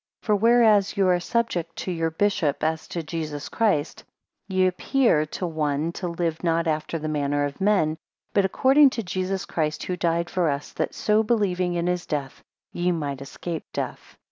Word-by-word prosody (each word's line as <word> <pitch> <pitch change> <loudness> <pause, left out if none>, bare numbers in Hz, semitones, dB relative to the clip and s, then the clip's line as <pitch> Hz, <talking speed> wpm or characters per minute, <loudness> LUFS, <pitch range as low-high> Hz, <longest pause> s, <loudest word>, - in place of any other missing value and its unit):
5 - - -23
For 210 - +3
whereas 220 -2 +4
ye 200 - +3
are 180 -1 +3
subject 175 -5 -1
to 185 - -4
your 165 -1 0
bishop 160 -4 0
as 160 0 -1
to 170 - -4
Jesus 155 -2 -5
Christ, 190 -9 0 0.4
ye 185 -1 +2
appear 185 - +2
to 180 - -4
one 155 -1 -1
to 180 +1 -5
live 170 -1 -2
not 165 0 +1
after 155 +1 -1
the 155 -1 -4
manner 145 -1 0
of 145 +5 -6
men, 190 -6 +2 0.4
but 200 - +4
according 270 +9 +5
to 235 -3 -4
Jesus 185 0 -2
Christ 155 -2 -2
who 180 - -2
died 170 -1 0
for 175 -3 0
us, 140 0 -3
that - - -2
so 215 0 +2
believing 185 -6 0
in 170 0 -1
his 180 0 -1
death, 140 -3 -4 0.3
ye 175 +1 +1
might 145 -5 -3
escape 160 +4 -6
death. - - -5
175 Hz, 185 wpm, -24 LUFS, 155-195 Hz, 0.4 s, according